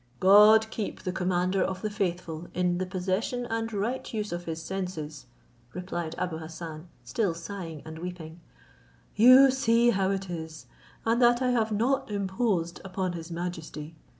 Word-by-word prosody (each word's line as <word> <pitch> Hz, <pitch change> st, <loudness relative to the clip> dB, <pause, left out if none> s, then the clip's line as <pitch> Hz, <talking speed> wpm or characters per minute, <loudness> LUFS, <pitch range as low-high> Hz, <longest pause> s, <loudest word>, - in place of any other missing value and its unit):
"God 210 Hz, +3 st, +7 dB
keep 215 Hz, -3 st, -5 dB
the 185 Hz, -, -2 dB
commander 180 Hz, +1 st, 0 dB
of 185 Hz, +1 st, -2 dB
the 215 Hz, -, 0 dB
faithful 175 Hz, -5 st, -3 dB
in 180 Hz, -1 st, +1 dB
the 185 Hz, -, -2 dB
possession 190 Hz, +6 st, -2 dB
and 225 Hz, 0 st, -2 dB
right 220 Hz, +5 st, -2 dB
use 215 Hz, -2 st, -3 dB
of 175 Hz, 0 st, -4 dB
his 160 Hz, -1 st, -4 dB
senses," 165 Hz, -6 st, -5 dB, 0.5 s
replied 175 Hz, -3 st, -4 dB
Abou 175 Hz, -3 st, -2 dB
Hassan, 160 Hz, 0 st, -8 dB, 0.2 s
still 175 Hz, -, -1 dB
sighing 165 Hz, -3 st, -7 dB
and 160 Hz, 0 st, -8 dB
weeping; 170 Hz, -2 st, -7 dB, 0.8 s
"you 255 Hz, +4 st, +8 dB
see 240 Hz, -2 st, +3 dB
how 190 Hz, -2 st, +1 dB
it 195 Hz, 0 st, -2 dB
is, 160 Hz, -2 st, -7 dB, 0.4 s
and 230 Hz, +2 st, +2 dB
that 240 Hz, +1 st, +5 dB
I 250 Hz, -, +2 dB
have 225 Hz, -3 st, +1 dB
not 235 Hz, +6 st, +1 dB
imposed 190 Hz, -3 st, -1 dB
upon 185 Hz, -1 st, -3 dB
his 165 Hz, -1 st, -7 dB
majesty. 165 Hz, -2 st, -6 dB
185 Hz, 155 wpm, -28 LUFS, 170-215 Hz, 0.8 s, you